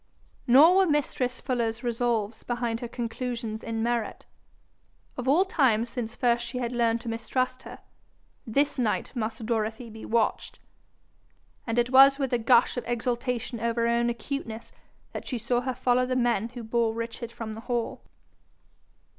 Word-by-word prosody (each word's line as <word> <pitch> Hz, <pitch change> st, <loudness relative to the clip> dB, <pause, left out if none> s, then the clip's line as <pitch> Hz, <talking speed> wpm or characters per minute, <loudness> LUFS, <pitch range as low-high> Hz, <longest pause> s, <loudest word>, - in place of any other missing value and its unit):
Nor 300 Hz, +9 st, +7 dB
were 385 Hz, -, +5 dB
mistress 270 Hz, -4 st, 0 dB
Fuller's 235 Hz, -2 st, -2 dB
resolves 235 Hz, -2 st, -1 dB
behind 240 Hz, -2 st, -2 dB
her 240 Hz, -, -5 dB
conclusions 235 Hz, -1 st, -4 dB
in 225 Hz, -1 st, -3 dB
merit: 235 Hz, -1 st, -2 dB, 0.9 s
of 250 Hz, 0 st, -5 dB
all 325 Hz, +8 st, +5 dB
times 240 Hz, -, +2 dB
since 235 Hz, -2 st, -4 dB
first 240 Hz, -1 st, +2 dB
she 240 Hz, +1 st, -5 dB
had 240 Hz, -1 st, -2 dB
learned 235 Hz, -1 st, +1 dB
to -, -, -10 dB
mistrust 255 Hz, +3 st, -2 dB
her, -, -, -10 dB, 0.7 s
this 280 Hz, +4 st, +1 dB
night 230 Hz, +2 st, -1 dB
must 225 Hz, 0 st, -3 dB
Dorothy 225 Hz, +1 st, -2 dB
be 220 Hz, 0 st, -10 dB
watched; 225 Hz, -1 st, 0 dB, 1.1 s
and 230 Hz, +1 st, -1 dB
it 240 Hz, +1 st, +2 dB
was 270 Hz, +1 st, +8 dB
with 270 Hz, -3 st, -2 dB
a 245 Hz, -, +2 dB
gush 235 Hz, +2 st, +4 dB
of 245 Hz, -, -3 dB
exultation 240 Hz, 0 st, -2 dB
over 235 Hz, +1 st, 0 dB
her -, -, +2 dB
own 235 Hz, 0 st, +2 dB
acuteness 235 Hz, -1 st, -5 dB, 0.4 s
that -, -, -7 dB
she 255 Hz, -, -2 dB
saw 240 Hz, +2 st, 0 dB
her 255 Hz, 0 st, -3 dB
follow 250 Hz, 0 st, +2 dB
the 255 Hz, -, -1 dB
men 235 Hz, -3 st, +1 dB
who 245 Hz, 0 st, -8 dB
bore 225 Hz, 0 st, 0 dB
Richard 230 Hz, 0 st, -5 dB
from 225 Hz, -2 st, -6 dB
the 220 Hz, -, -8 dB
hall. 240 Hz, -1 st, -3 dB
235 Hz, 165 wpm, -27 LUFS, 230-250 Hz, 1.1 s, was